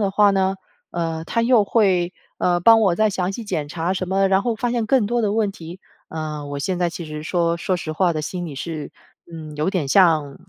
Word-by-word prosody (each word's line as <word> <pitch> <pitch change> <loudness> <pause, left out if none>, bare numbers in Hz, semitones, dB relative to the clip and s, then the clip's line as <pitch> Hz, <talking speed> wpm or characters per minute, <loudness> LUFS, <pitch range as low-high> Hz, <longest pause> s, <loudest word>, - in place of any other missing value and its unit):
的 200 -2 +1
话 205 +1 +4
呢， 190 -1 +1 0.4
呃， 165 -1 -3
他 230 +7 -1
又 235 -3 +4
会， 190 -5 +2 0.3
呃， 175 -1 +1
帮 225 +5 +6
我 195 -5 +3
再 215 +3 +2
详 185 -1 -2
细 230 +3 -6
检 155 -8 -3
查 165 +3 -2
什 185 -1 -3
么， 195 +1 +2
然 190 0 +3
后 235 +1 0
发 245 +2 -2
现 235 -2 -1
更 245 -2 +3
多 240 +3 0
的 205 -2 +1
问 215 -2 +1
题， 175 0 -10 0.3
呃， 155 -2 -5
我 145 0 -5
现 180 +5 -2
在 175 -1 +1
其 170 0 -7
实 150 -1 -7
说， 170 +1 0
说 185 +2 -1
实 165 -3 -5
话 175 +2 +1
的 155 -1 -3
心 175 +3 -4
里 150 - -7
是， 155 +2 -6 0.4
嗯， 155 -2 -8
有 150 +3 0
点 180 -8 -1
像 155 -5 +3
180 Hz, 250 characters per minute, -21 LUFS, 160-200 Hz, 0.4 s, 帮